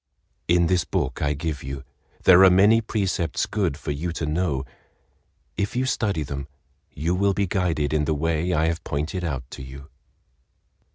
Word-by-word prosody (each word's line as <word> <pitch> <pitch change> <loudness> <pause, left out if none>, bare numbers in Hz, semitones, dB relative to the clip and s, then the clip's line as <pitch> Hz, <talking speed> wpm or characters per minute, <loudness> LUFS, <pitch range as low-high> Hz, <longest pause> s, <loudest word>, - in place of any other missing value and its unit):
"In 85 0 +4
this 90 0 +2
book - - -2
I 75 0 +1
give 75 -1 -4
you 70 +1 -6 0.4
there 95 0 +8
are 95 - +9
many 100 +5 +5
precepts 95 -7 -1
good 70 - -1
for 75 - -4
you 80 +5 -3
to 80 - -3
know—if 75 - -5
you 130 +1 +1
study 100 -10 0
them, 70 -1 -5 0.4
you 80 +5 -1
will 100 +1 +2
be 100 - +1
guided 85 -6 0
in 75 -1 +1
the 80 - 0
way 80 +3 0
I 80 -2 +2
have 80 0 -1
pointed 75 +5 -3
out 70 -7 -2
to - - -8
you." 70 +2 -10
80 Hz, 170 wpm, -24 LUFS, 75-95 Hz, 0.4 s, are